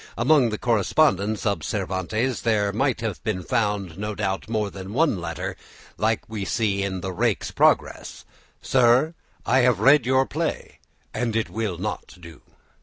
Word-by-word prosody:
Among 130 0 +4
the 105 - -3
correspondence 110 - +1
of 100 -6 0
Cervantes 110 - -2
there 105 -3 +1
might 130 +2 0
have 110 -5 -4
been 105 -5 -2
found, 100 -4 -1
no 105 0 -3
doubt, 95 +2 -3
more 105 -3 -1
than 95 +1 -8
one 145 - +2
letter 85 0 -4 0.4
like 110 +1 0
that - - -30
we 105 -3 -3
see 100 -2 0
in 95 -2 -3
the 95 +1 -4
"Rake's - - 0
Progress," - - +1 0.4
"Sir, 130 +5 +3 0.3
I 130 +3 +3
have 125 -5 +3
read 135 +3 +5
your 130 +1 +3
play, 160 +3 -4 0.3
and 115 -2 -2
it 115 - -1
will 105 -6 -3
not 100 +2 -5
doo." 85 -3 -13
110 Hz, 165 wpm, -24 LUFS, 100-125 Hz, 0.4 s, read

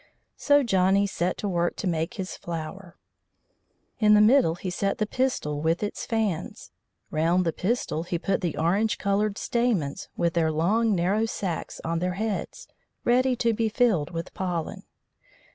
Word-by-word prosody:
So 285 -1 +3
Johnny 195 -2 +3
set 180 -2 -1
to 205 - -3
work 175 -2 0
to - - -5
make 165 +4 -1
his 190 -3 -5
flower. 170 +2 -7 1.0
In 210 -1 +6
the - - +6
middle 215 -5 +5
he 180 +1 -5
set 195 +2 -1
the 215 - 0
pistil 210 - -1
with 165 +5 0
its 205 - -4
fans. 220 -1 -2 0.4
Round 170 +4 +2
the 165 - 0
pistil 205 -5 -1
he 170 +1 -3
put 195 +3 -1
the 175 -5 -2
orange 200 +7 +1
coloured 200 +1 0
stamens 225 -13 -1
with 170 -1 +1
their 160 -2 +2
long 205 +8 +2
narrow 195 +6 +1
sacks 185 -6 -4
on 165 0 -1
their 180 +1 -1
heads, 215 0 -4 0.4
ready 255 +1 +3
to 230 -1 +1
be 225 0 0
filled 215 - +2
with 165 -1 -6
pollen. 175 -4 -4
190 Hz, 160 wpm, -26 LUFS, 170-220 Hz, 1.0 s, In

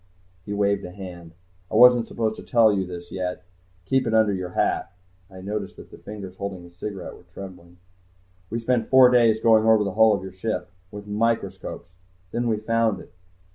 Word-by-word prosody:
_" - - -36 0.4
He - - -7
waved 100 -1 +1
a - - -6
hand. 90 -3 -10 0.4
"I - - -4
wasn't 120 0 +7
supposed 110 -1 -2
to - - -8
tell 115 -3 +4
you 95 -2 -1
this 85 -1 -9
yet. 90 -1 -4 0.4
Keep 130 +5 +1
it 110 - +1
under 110 -2 +4
your 95 -2 -4
hat." 90 - -1 0.4
I 95 -1 -12
noticed 100 0 -5
that - - -14
the - - -13
fingers 100 -3 -9
holding 100 -3 -5
his 85 0 -16
cigarette 95 +1 -6
were - - -18
trembling. 90 -2 -11 0.7
"We 115 - -2
spent 115 -1 0
four 130 -1 +7
days 115 -3 +4
going 110 -1 +4
over 110 -1 +5
the 100 - -2
hull 110 0 +5
of 95 - -6
your 95 - -7
ship 110 +4 -4 0.2
with 105 0 -9
microscopes. 110 -3 -2 0.4
Then 120 0 -1
we 110 -2 +1
found 110 -1 0
it. - - -14
105 Hz, 200 wpm, -24 LUFS, 95-115 Hz, 0.7 s, wasn't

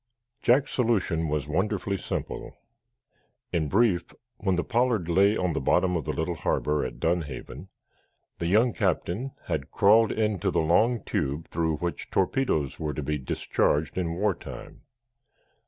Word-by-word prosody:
Jack's 135 +3 +3
solution 95 -9 +1
was 75 -2 -2
wonderfully 100 +5 -1
simple. - - -5 1.0
In 80 -4 0
brief, 95 -4 +2 0.3
when 95 -3 0
the 90 - 0
"Pollard" 120 -7 +1
lay 100 +5 +4
on 90 -2 0
the 75 - -2
bottom 90 +6 +2
of 80 -6 -2
the - - -1
little 80 +2 -2
harbor 75 -2 0
at - - -5
Dunhaven, 80 -1 -3 0.7
the 85 - -1
young 110 +6 +3
captain 100 - -1
had 80 -5 -3
crawled 110 +2 +5
into 105 -4 0
the - - +1
long 110 +9 +2
tube 70 +4 -2
through 80 -1 0
which 85 +2 -4
torpedoes 95 - 0
were 75 -3 -3
to 75 - -3
be 75 +1 -1
discharged 75 +3 0
in 85 -3 -1
war 100 +2 +1
time. - - -10
90 Hz, 150 wpm, -27 LUFS, 80-105 Hz, 1.0 s, crawled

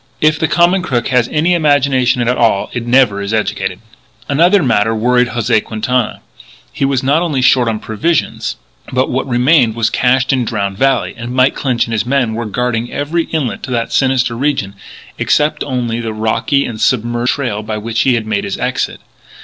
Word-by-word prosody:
If 155 0 +2
the 160 - +1
common 175 +3 +3
crook 130 -10 -2
has 125 -2 +2
any 165 +4 +1
imagination 135 -6 +2
at 125 - +2
all 110 -5 +1
it 120 -1 -4
never 120 -5 +3
is 100 +2 -2
educated. 95 -3 -2 0.5
Another 170 +6 +3
matter 115 -3 +1
worried 125 +2 +2
José 120 -2 0
Quintana: 120 +2 -2 0.5
he - - -3
was 135 -2 0
not 145 +5 +2
only 155 -6 -1
short 130 -1 +4
on 110 -1 0
provisions, 110 +10 -2 0.4
but 130 +1 0
what 130 +2 -2
remained 125 -1 +3
was 115 -1 0
cached 130 +1 +2
in 130 -2 +1
Drowned 100 -4 -3
Valley; 135 0 +1
and 120 +1 -6
Mike 130 +1 +3
Clinch 125 -4 -1
and 115 - -6
his 110 - 0
men 125 -4 +1
were 115 +1 -3
guarding 120 +1 -2
every 160 +4 -2
outlet 150 -7 -2
to - - -7
that 115 -2 -2
sinister 130 -3 +1
region, 125 -7 -1 0.5
excepting 150 -1 0
only 120 -3 -2
the 115 -2 -4
rocky 110 +6 0
and 110 -2 -6
submerged 120 0 +1
trail 120 -7 -3
by 110 0 -4
which 110 +1 -2
he 130 -2 +3
had 115 -2 -2
made 110 -2 -1
his - - -4
exit. - - -2
125 Hz, 190 wpm, -15 LUFS, 115-140 Hz, 0.5 s, short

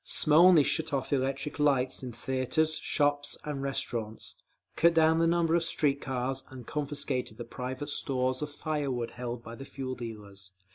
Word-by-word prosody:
Smolny 165 +1 +6
shut 160 +1 0
off 135 +1 -1
all 140 - +4
electric 135 +3 -2
lights 135 -3 +2
in 130 -2 -5
theatres, 130 +6 0
shops 145 -1 0
and 145 -2 -4
restaurants, 115 -5 -2 0.4
cut 170 0 +4
down 160 0 +5
the 165 - +4
number 170 -1 +2
of 170 0 +3
street 145 -4 +1
cars, 130 0 -2
and 130 -2 -10
confiscated 140 -6 -2
the 120 - -6
private 130 +4 -5
stores 130 -1 0
of 150 - -2
fire 150 -1 -2
wood 120 -2 -2
held 120 -1 -5
by 115 - -8
the 135 - -8
fuel 135 -1 -5
dealers…. 100 -6 -7
135 Hz, 175 wpm, -30 LUFS, 125-150 Hz, 0.4 s, Smolny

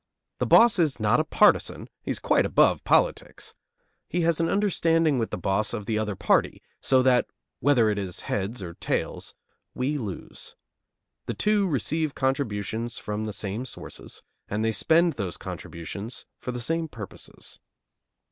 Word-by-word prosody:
The - - 0
boss 230 -4 +6
is 155 -7 +2
not 110 +5 +3
a - - +3
partisan; 210 +6 +3
he - - -9
is - - 0
quite - - +2
above - - +3
politics! - - +1 0.6
He 175 - 0
has 170 -1 +2
an 165 - +1
understanding 165 -7 +2
with 115 - -1
the - - -4
boss 95 +5 0
of 105 -3 -6
the 110 0 0
other 105 -2 -2
party, - - +1 0.2
so 130 -1 +3
that, 125 -1 +4 0.3
whether 130 -5 +4
it 105 -1 0
is 95 -3 -5
heads 100 +2 -3
or 85 -2 -7
tails, - - -3 0.4
we 140 +4 -1
lose. 105 -7 -7 0.7
The - - -3
two 210 -2 +2
receive 155 - -1
contributions 115 -4 -2
from 105 +1 -4
the 110 - -3
same 105 +3 -4
sources, 130 - -9 0.2
and 105 +2 -1
they 115 - +2
spend 165 +8 +3
those 95 -6 -4
contributions 100 +7 -7
for 125 - -4
the 125 - -5
same 165 +6 -1
purposes. 110 -9 -10
125 Hz, 160 wpm, -26 LUFS, 105-160 Hz, 0.7 s, boss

